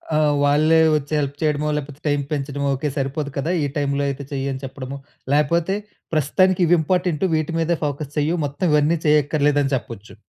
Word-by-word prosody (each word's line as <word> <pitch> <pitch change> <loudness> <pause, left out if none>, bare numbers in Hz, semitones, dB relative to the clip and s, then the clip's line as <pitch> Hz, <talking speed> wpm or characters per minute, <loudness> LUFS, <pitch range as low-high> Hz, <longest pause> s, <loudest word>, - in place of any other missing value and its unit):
ఆ! - - +3 0.3
వాళ్ళే 155 +3 +4 0.2
వచ్చి 145 0 -3
హెల్ప్ 140 -1 -2
చేయడమో 150 -1 0
లేకపోతే 145 0 -6
టైమ్ 145 -1 +1
పెంచడమో 140 -1 -2
"ఓకే 145 +3 -2
సరిపోదు 140 +1 -2
కదా! 155 +5 -1
ఈ - - +1
టైమ్‌లో 140 0 0
అయితే 140 +1 -5
చెయి", 135 -1 -2
అని 130 0 -5
చెప్పడమో 135 0 -6 0.4
లేకపోతే 170 +5 +2 0.4
"ప్రస్తుతానికి 180 +5 +2
ఇవి 175 - +5
ఇంపార్టెంటు, 180 0 0
వీటి 155 +1 -1
మీదే 165 0 +1
ఫోకస్ 145 0 -4
చెయు 150 +4 +1
మొత్తం 145 +6 -3
ఇవన్నీ 150 +3 +3
చేయక్కర్లేదు" 150 -1 +3
అని 135 0 -1
చెప్పొచ్చు. 115 -3 -7
145 Hz, 175 wpm, -21 LUFS, 140-155 Hz, 0.4 s, ఇవి